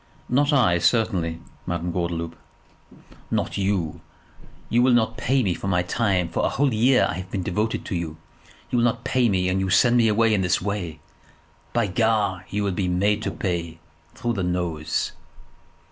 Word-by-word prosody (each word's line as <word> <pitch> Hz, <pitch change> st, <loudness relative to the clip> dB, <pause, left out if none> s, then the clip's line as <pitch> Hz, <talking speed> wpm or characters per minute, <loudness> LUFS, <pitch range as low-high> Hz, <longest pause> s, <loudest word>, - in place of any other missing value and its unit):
"Not 140 Hz, +4 st, +3 dB
I, 110 Hz, -12 st, +3 dB
certainly, 85 Hz, -3 st, +1 dB, 0.3 s
Madame 85 Hz, 0 st, -2 dB
Gordeloup." 85 Hz, -1 st, -3 dB, 0.9 s
"Not -, -, -1 dB
you! 95 Hz, -5 st, -1 dB, 0.7 s
You 120 Hz, -, +2 dB
will 125 Hz, 0 st, +4 dB
not 115 Hz, -1 st, +2 dB
pay 130 Hz, +2 st, +1 dB
me 95 Hz, -4 st, +1 dB
for 90 Hz, -, -6 dB
my 90 Hz, -2 st, +2 dB
time; 95 Hz, -2 st, 0 dB
for -, -, -2 dB
a -, -, +2 dB
whole 140 Hz, -2 st, +1 dB
year 125 Hz, +4 st, +4 dB
I -, -, -3 dB
have 95 Hz, 0 st, -8 dB
been 95 Hz, -2 st, -3 dB
devoted 105 Hz, +6 st, -1 dB
to 100 Hz, -, -3 dB
you! 80 Hz, -2 st, -4 dB, 0.5 s
You 120 Hz, -, +2 dB
will 120 Hz, -, +3 dB
not 120 Hz, 0 st, 0 dB
pay 125 Hz, -2 st, +2 dB
me, 90 Hz, -2 st, +1 dB
and 90 Hz, +1 st, +1 dB
you 95 Hz, 0 st, -1 dB
send 120 Hz, +7 st, +4 dB
me 115 Hz, -2 st, +4 dB
away 110 Hz, +1 st, +3 dB
in 100 Hz, -, +2 dB
this 90 Hz, -2 st, +2 dB
way? 90 Hz, -6 st, -4 dB, 0.7 s
By 120 Hz, -2 st, +1 dB
Gar, 100 Hz, -2 st, 0 dB
you 105 Hz, 0 st, -1 dB
will 100 Hz, -, 0 dB
be 90 Hz, 0 st, -1 dB
made 100 Hz, +4 st, +1 dB
to -, -, -2 dB
pay, 85 Hz, -3 st, -3 dB, 0.4 s
through 120 Hz, 0 st, -2 dB
the 100 Hz, -4 st, -2 dB
nose." 85 Hz, -4 st, -1 dB
95 Hz, 185 wpm, -24 LUFS, 90-115 Hz, 0.9 s, will